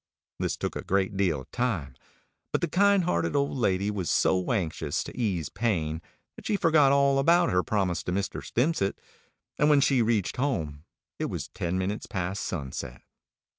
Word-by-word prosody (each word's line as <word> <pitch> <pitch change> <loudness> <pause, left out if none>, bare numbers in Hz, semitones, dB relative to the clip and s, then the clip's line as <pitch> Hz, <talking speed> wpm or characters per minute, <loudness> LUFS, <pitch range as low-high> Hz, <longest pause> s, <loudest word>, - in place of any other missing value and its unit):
This - - -1
took - - -3
a - - -4
great 95 +1 0
deal 90 -8 +1
of - - -16
time; 95 - -1 0.6
but - - 0
the 170 - +1
kind 200 +3 +4
hearted 85 - 0
old 140 0 +1
lady 100 -4 +1
was 95 -5 -3
so 90 +3 +2
anxious 80 -8 -1
to - - -9
ease 95 - -1
pain 85 -8 -1 0.3
that - - -9
she 210 - +1
forgot 155 -7 +4
all 140 -1 +4
about 170 +5 +4
her 90 - +3
promise 90 -3 0
to - - -2
Mr. 100 +2 -2
Stimpcett, 125 -6 0 0.6
and 150 - +4
when 145 -2 +6
she 135 -2 +3
reached 110 -2 0
home 80 - -2 0.3
it - - 0
was - - -4
ten 90 +1 -2
minutes 95 +3 -2
past 95 -1 -3
sunset. 65 -6 -5
100 Hz, 175 wpm, -27 LUFS, 85-135 Hz, 0.6 s, when